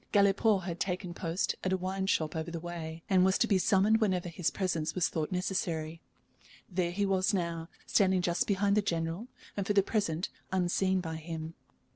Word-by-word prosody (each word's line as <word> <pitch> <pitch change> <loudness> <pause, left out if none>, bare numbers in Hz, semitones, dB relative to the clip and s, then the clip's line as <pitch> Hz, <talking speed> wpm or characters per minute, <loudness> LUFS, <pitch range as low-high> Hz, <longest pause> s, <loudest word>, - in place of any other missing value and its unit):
Galipaud 200 0 +4
had 175 -1 -4
taken 180 -2 -2
post 170 +1 -1
at 185 - 0
a 190 - +2
wine 190 +1 -2
shop 160 -5 +1
over 160 +1 -3
the 170 0 -4
way, 165 -1 -6
and 185 -2 +4
was 190 0 +4
to - - +3
be 200 -4 +3
summoned 210 +3 +4
whenever 185 -4 +1
his 170 0 -1
presence 165 -5 -1
was 180 -3 +2
thought 155 +1 -2
necessary. 170 -3 -2 0.7
There 180 -2 0
he 200 +3 0
was 195 +1 +2
now, 170 -2 -2 0.2
standing 190 -2 +3
just 175 0 +1
behind 200 0 +2
the 210 - +4
General, 170 +3 -2 0.3
and 200 -1 -2
for 205 - +2
the 200 -1 +5
present 190 -6 -1 0.2
unseen 190 +1 +1
by 160 -2 -4
him. 160 0 -6
185 Hz, 190 wpm, -31 LUFS, 165-195 Hz, 0.7 s, the